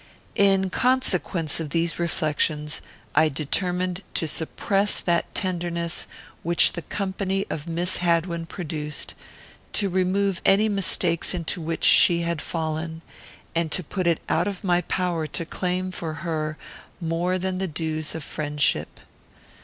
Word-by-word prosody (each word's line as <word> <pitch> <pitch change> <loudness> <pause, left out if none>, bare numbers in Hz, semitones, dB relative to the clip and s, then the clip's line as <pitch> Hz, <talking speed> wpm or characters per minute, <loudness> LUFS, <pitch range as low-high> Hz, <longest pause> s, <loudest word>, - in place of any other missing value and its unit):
In 195 -1 +4
consequence 185 - +3
of 160 -2 -4
these 165 +2 0
reflections, 155 -2 0 0.3
I 155 +1 +5
determined 180 +5 -1
to 160 - 0
suppress 195 +6 +1
that 170 -1 0
tenderness 170 -2 -1 0.3
which 170 +1 +4
the 170 - -4
company 195 +1 -2
of 150 +1 -4
Miss 175 +2 +1
Hadwin 170 -1 0
produced, 150 -5 -4 0.6
to 200 -2 +2
remove 190 +1 +1
any 205 +3 +5
mistakes 185 -4 +2
into 170 0 -2
which 165 +1 -3
she 170 -1 +6
had 170 -2 -1
fallen, 160 0 -3 0.5
and 165 -2 0
to 185 - 0
put 180 +3 -2
it 170 -2 +3
out 170 +4 +1
of 200 0 -4
my 175 -2 +3
power 175 -2 -1
to 165 - -3
claim 185 +2 -2
for 165 -3 -4
her 155 -2 -2 0.4
more 175 +2 0
than 185 0 -2
the 190 - -1
dues 155 -1 -2
of 160 - -4
friendship. 150 0 -1
170 Hz, 140 wpm, -25 LUFS, 160-185 Hz, 0.6 s, she